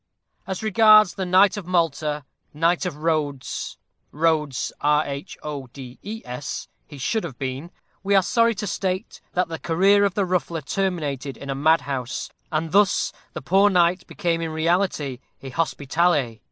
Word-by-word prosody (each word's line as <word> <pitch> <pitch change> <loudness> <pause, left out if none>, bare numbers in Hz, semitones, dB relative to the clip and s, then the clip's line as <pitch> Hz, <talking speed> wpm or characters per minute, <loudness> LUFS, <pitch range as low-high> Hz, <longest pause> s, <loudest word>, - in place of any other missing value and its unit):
As 190 +2 -4
regards 215 -2 +6
the 190 -1 -4
knight 190 +3 +5
of 190 -4 -6
Malta 155 -4 0 0.3
Knight 170 +4 +2
of 175 - -5
Roads 150 -5 -2 0.3
"Rhodes" 150 -4 0
he 145 - -3 0.7
should 215 - -1
have 140 -8 -7
been 135 +5 -4 0.3
we 200 +1 +1
are 195 - +5
sorry 230 +3 +2
to 210 +2 -4
state 190 +1 -3
that 180 -1 +1
the 165 -1 -6
career 195 +5 +3
of 200 -2 +1
the 200 -2 +1
Ruffler 175 -2 -1
terminated 145 -6 -2
in 140 0 -6
a - - -2
madhouse, 140 -4 0 0.2
and 160 0 -1
thus 200 0 +3 0.2
the 170 - -6
poor 195 +7 +4
knight 180 -1 +2
became 170 -4 -1
in 165 - -2
reality 160 -4 0 0.2
a 135 - -6
Hospitaller! 150 -4 0
165 Hz, 140 wpm, -23 LUFS, 145-190 Hz, 0.7 s, regards